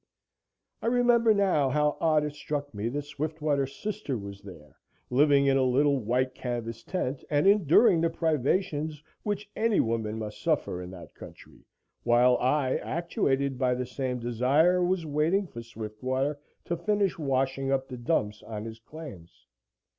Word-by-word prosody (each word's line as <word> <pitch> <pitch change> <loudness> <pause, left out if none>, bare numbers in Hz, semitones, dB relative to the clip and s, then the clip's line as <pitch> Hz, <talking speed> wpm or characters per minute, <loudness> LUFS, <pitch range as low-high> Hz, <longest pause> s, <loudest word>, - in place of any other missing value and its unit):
I 225 - -2
remember 240 -1 +4
now 190 -9 +2
how 150 +2 +1
odd 155 -2 +3
it 150 -1 -3
struck 145 -1 -4
me 105 +3 -2
that 145 +4 -3
Swiftwater's 145 -2 -2
sister 210 - -4
was 100 -1 -8
there, 85 -7 -13 0.4
living 140 +1 +4
in 135 0 +4
a - - +3
little 140 +2 +3
white 125 +3 0
canvas 115 -3 -5
tent, 135 -2 -3
and 145 +1 +2
enduring 195 - +5
the 165 - +2
privations 155 -1 -1 0.2
which 205 0 -3
any 220 -1 +2
woman 110 -1 -1
must 105 -1 -6
suffer 90 - 0
in 90 - -7
that 90 -2 -11
country, - - -14 0.3
while 120 +1 +4
I, 130 0 +1
actuated 140 -5 -1
by 125 -2 +2
the 125 0 -3
same 125 0 -3
desire, 135 +10 +2
was 180 -1 0
waiting 155 +7 +1
for 120 -9 -9
Swiftwater 125 +6 -3 0.3
to 170 - -1
finish 205 -1 0
washing 135 -1 0
up 135 -1 0
the 125 - -7
dumps 110 -5 -1
on 105 -1 -7
his 115 0 -8
claims. 115 - -12
140 Hz, 155 wpm, -28 LUFS, 120-160 Hz, 0.4 s, enduring